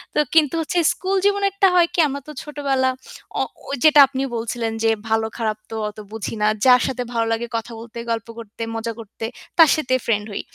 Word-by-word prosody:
তো - - +3 0.2
কিন্তু 310 -1 +4
হচ্ছে 345 +3 -1
স্কুল 380 +2 -1
জীবনে 405 0 +2
একটা 395 -1 +4
হয় 345 -1 +5
কি - - -1
আমরা 280 0 -5
তো - - -7
ছোটবেলা 275 -3 0 0.5
অ - - +2 0.2
ঐ - - -15 0.2
যেটা 305 -1 +7
আপনি 265 0 -4 0.2
বলছিলেন 230 0 -3
যে 225 - +4 0.2
ভালো 220 0 +2
খারাপ 220 -2 -1
তো - - -4
অত 210 - -15
বুঝি 220 0 -5
না। 210 - +3 0.2
যার 250 -1 +7
সাথে 255 -1 -3
ভালো 230 -1 +1
লাগে 235 +1 -2
কথা 225 +1 -6
বলতে, 235 0 -11
গল্প 225 -2 -2
করতে, 225 0 -11 0.2
মজা 230 +1 -3
করতে 225 +1 -8 0.3
তার 320 -3 +9
সাথে 255 -4 0
ফ্রেন্ড 210 -3 0
হই। 200 - -3
250 Hz, 210 wpm, -21 LUFS, 225-300 Hz, 0.5 s, তার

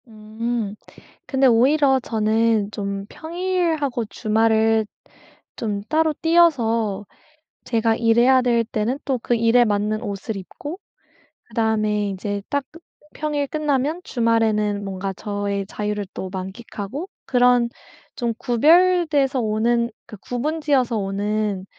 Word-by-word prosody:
음 220 0 -4 0.5
근데 270 0 +2
오히려 265 +3 +4
저는 220 -2 +1
좀 200 -1 -4
평일하고 330 -7 -1
주말을 220 +1 +2 0.7
좀 205 -3 -3
따로 315 0 +2
떼어서 230 - +2 0.6
제가 225 -1 +1
일해야 240 +3 +4
될 235 -2 +2
때는 225 +4 -2
또 265 -2 0
그 240 - +1
일에 230 +2 +4
맞는 210 0 0
옷을 200 +2 -4
입고 290 - -8 0.7
그다음에 215 -2 0
이제 200 +1 -4
딱 285 -1 -1 0.5
평일 295 -1 -2
끝나면 300 +2 -1
주말에는 220 - +1
뭔가 195 0 -4
저의 200 -1 -3
자유를 210 0 -3
또 190 - -5
만끽하고 200 - -6 0.2
그런 245 -1 +3 0.5
좀 235 -2 -1
구별돼서 305 +1 +3
오는 235 +2 +1 0.2
그 215 - -10
구분 290 +10 -3
지어서 260 -6 +1
오는 200 0 -2
230 Hz, 235 characters per minute, -22 LUFS, 210-270 Hz, 0.7 s, 오히려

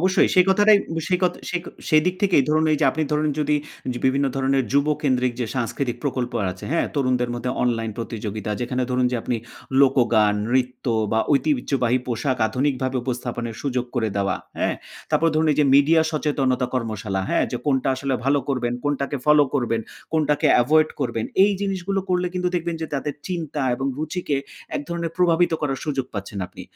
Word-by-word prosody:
অবশ্যই 185 +2 +3
সেই 180 -1 +6
কথাটাই 205 +1 +6 0.2
ব - - -5
সেই 180 -1 +2
কথ 180 - +3 0.2
সেই 180 - -1
ক - - -16 0.2
সেই 155 -1 +5
দিক 180 - +1
থেকেই 180 -8 +4
ধরুন, 155 +1 +3
এই - - +3
যে - - +4
আপনি 155 - -2
ধরুন, 150 0 +1
যদি 150 0 +2 0.4
যে 120 - -5
বিভিন্ন 135 +1 +2
ধরণের 135 -1 +1
যুবকেন্দ্রিক 140 -3 +1
যে 120 - 0
সাংস্কৃতিক 120 0 -2
প্রকল্প 125 -3 -2 0.2
আছে, 90 - -11
হ্যাঁ? 170 - +1
তরুণদের 125 -3 +1
মধ্যে 125 +1 -3
অনলাইন 115 -2 0
প্রতিযোগিতা 110 -2 -4
যেখানে 125 +1 -1
ধরুন, 125 0 +2
যে - - +1
আপনি 120 - -1 0.5
লোকগান, 115 -6 +4 0.2
রিত্য 125 0 -1 0.3
বা 110 - +3
ঐতিহ্যবাহী 130 -3 +1
পোশাক 125 +2 -1
আধুনিকভাবে 130 +1 -1
উপস্থাপনের 120 -2 -4
সুযোগ 125 -3 -1
করে 110 -3 +1
দেওয়া। 100 0 0 0.2
হ্যাঁ? - - +1 0.4
তারপর 165 - +3
ধরুন, 155 0 +2
এই - - -3
যে - - +4
মিডিয়া 160 +3 +5
সচেতনতা 135 -5 0
কর্মশালা, 110 -5 -2
হ্যাঁ? - - +2
যে - - 0
কোনটা 135 -1 +1
আসলে 135 0 -2
ভালো 140 +1 +3
করবেন, 120 -3 0
কোনটাকে 145 0 -1
ফলো 150 -1 +6
করবেন, 115 -4 0 0.3
কোনটাকে 150 -2 +2 0.2
এভয়েড 155 +4 +4
করবেন? 115 -2 -1 0.2
এই 205 - +3
জিনিসগুলো 195 0 -1
করলে 180 0 +1
কিন্তু 180 0 0
দেখবেন 170 -1 -1
যে - - -2
তাদের 145 +1 -2
চিন্তা 160 -5 -3
এবং 135 +2 -3
রুচিকে 155 -2 -2 0.4
এক - - -3
ধরনের 170 -1 -3
প্রভাবিত 175 -1 +3
করার 135 -3 -1
সুযোগ 140 -4 -2
পাচ্ছেন 100 0 -5
আপনি। - - -11
135 Hz, 180 wpm, -23 LUFS, 125-155 Hz, 0.5 s, সেই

